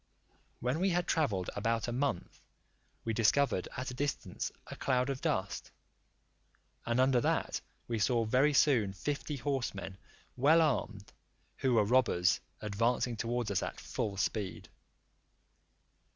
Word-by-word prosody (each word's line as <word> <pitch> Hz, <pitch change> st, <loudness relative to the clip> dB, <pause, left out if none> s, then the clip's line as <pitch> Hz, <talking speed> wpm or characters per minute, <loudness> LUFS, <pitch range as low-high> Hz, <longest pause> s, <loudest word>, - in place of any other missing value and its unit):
When 125 Hz, +6 st, 0 dB
we 190 Hz, +2 st, +2 dB
had 175 Hz, -1 st, +1 dB
travelled 105 Hz, -, 0 dB
about 115 Hz, +3 st, 0 dB
a -, -, -2 dB
month, 125 Hz, -6 st, -2 dB, 0.6 s
we 115 Hz, -, 0 dB
discovered 115 Hz, -1 st, +2 dB
at 130 Hz, 0 st, -3 dB
a -, -, -6 dB
distance 140 Hz, +3 st, -3 dB
a -, -, -8 dB
cloud 130 Hz, 0 st, +1 dB
of 135 Hz, -, -5 dB
dust, 95 Hz, +1 st, -2 dB, 1.2 s
and 115 Hz, +1 st, +1 dB
under 130 Hz, -1 st, +4 dB
that -, -, 0 dB, 0.3 s
we 115 Hz, -2 st, -1 dB
saw 115 Hz, +2 st, +2 dB
very 130 Hz, +7 st, +3 dB
soon 125 Hz, -9 st, +3 dB
fifty 145 Hz, -, -3 dB
horsemen 120 Hz, -8 st, -3 dB, 0.4 s
well 145 Hz, +6 st, +5 dB
armed, 110 Hz, -8 st, -2 dB, 0.4 s
who 130 Hz, -2 st, +2 dB
were 110 Hz, -2 st, +4 dB
robbers, 105 Hz, -6 st, +3 dB, 0.2 s
advancing 115 Hz, +3 st, 0 dB
towards 120 Hz, -1 st, -2 dB
us 95 Hz, -, +1 dB
at -, -, -5 dB
full 100 Hz, -2 st, -3 dB
speed. 100 Hz, -2 st, -2 dB
120 Hz, 135 wpm, -32 LUFS, 105-135 Hz, 1.2 s, well